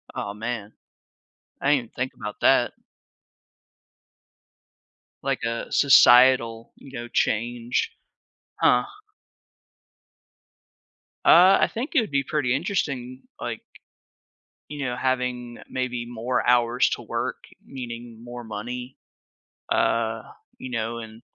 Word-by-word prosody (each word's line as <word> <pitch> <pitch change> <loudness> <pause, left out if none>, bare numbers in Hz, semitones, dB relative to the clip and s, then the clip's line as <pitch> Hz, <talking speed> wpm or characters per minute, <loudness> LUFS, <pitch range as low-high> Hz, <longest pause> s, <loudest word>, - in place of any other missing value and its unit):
Oh, 100 - -4
man, 110 -1 -5 0.9
I 145 +2 +4
didn't 120 -5 -5
think 130 +1 -3
about 105 -2 -7
that. 125 -2 +4 2.5
Like 135 -2 -1
a, 115 0 -3
societal, 120 -4 +5
you 135 -2 -11
know, 120 0 -6
change. 120 +1 -1 0.7
Huh? - - +5 2.4
Uh, 185 +3 +7
I - - +3
think 245 +7 -4
it 290 - +5
would 215 - -5
be 140 -1 +1
pretty 130 -3 0
interesting, 135 -7 -3 0.2
like, - - -5 1.1
you 145 -2 -5
know, 125 0 -3
having 125 -2 -2
maybe 125 -2 -3
more 120 +2 -2
hours 120 0 +4
to - - -3
work, - - -4 0.2
meaning 120 -2 -8
more 120 0 -8
money, 120 +4 -6 0.8
uh, 115 -1 +1 0.3
you 130 - -8
know 115 0 -2
and 110 0 -10
120 Hz, 105 wpm, -24 LUFS, 115-130 Hz, 2.5 s, Uh